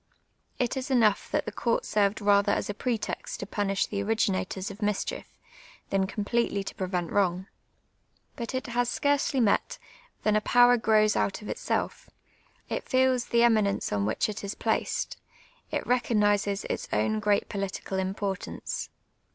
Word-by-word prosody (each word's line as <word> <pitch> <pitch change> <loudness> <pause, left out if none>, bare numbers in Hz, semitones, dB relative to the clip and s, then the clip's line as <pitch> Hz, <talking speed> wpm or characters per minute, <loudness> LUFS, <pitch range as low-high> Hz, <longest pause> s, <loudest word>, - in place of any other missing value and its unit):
It 245 -2 0
is 265 +1 -4
enou<j:h 225 -6 +3
that - - 0
the - - -4
court 230 +2 0
served 205 0 +1
rather 200 0 +4
as - - -1
a - - -6
pretext 230 +1 -3
to - - -4
punish 195 -1 0
the 200 -1 -3
ori^^inators 200 -3 -1
of 200 +3 -12
mischief, 205 -1 -2 0.5
than 195 -1 +2
completely 205 0 -1
to - - -6
pre 185 - -3
vent 180 -2 -2
>\Tont;. 185 -2 +1 0.9
Ikit 235 -1 -5
it 260 - -2
has 245 0 +1
scarcely 285 0 +1
met, 220 -5 +2 0.5
than 215 -1 +3
a 215 - +3
])ower 245 0 +7
j^rows 215 -1 +3
out 200 - -1
of - - -7
itself; - - -2 0.6
it - - -4
feels 260 -2 +3
the 235 0 +3
eminence 215 - +2
on 100 0 0
which 110 - +1
it 215 -1 -6
is 200 0 -5
])laced; - - 0 0.5
it - - -2
rc 250 0 +2
cofxniscs 205 -2 +1
its - - -4
own 215 0 +1
jji 210 -1 +4
eat - - -7
])olitical 195 -1 -3
imj)ortance. 195 -3 -4
210 Hz, 165 wpm, -28 LUFS, 200-235 Hz, 0.9 s, ower